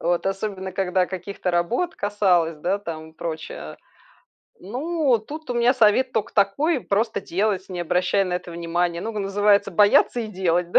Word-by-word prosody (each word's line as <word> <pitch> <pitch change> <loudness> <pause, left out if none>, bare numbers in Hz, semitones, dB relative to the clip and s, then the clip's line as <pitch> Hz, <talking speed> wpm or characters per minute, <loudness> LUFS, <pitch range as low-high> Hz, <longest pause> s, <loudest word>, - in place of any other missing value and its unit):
Вот 175 +1 0
особенно 195 -1 -3
когда 185 -1 +1
каких-то 190 0 -4
работ 230 - 0
касалось, 185 -6 +1
да, 185 +6 0
там 160 -4 -7
прочее. 160 -1 -6 0.8
Ну, 270 - 0
тут 290 +6 -9
у - - -1
меня 240 +2 +3
совет 250 +2 +3
тока 220 +1 -2
такой: 260 - +2
просто 220 +2 0
делать, 195 +1 -1
не 180 -2 -5
обращая 180 +3 +1
на 180 -1 -2
это 180 -1 -5
внимание. 170 0 -1
Ну 225 - -4
и, - - 0
называется, 200 0 +2
бояться 210 +6 +4
и 225 - -4
делать, 180 -3 0
да. - - +7
195 Hz, 165 wpm, -23 LUFS, 175-220 Hz, 0.8 s, да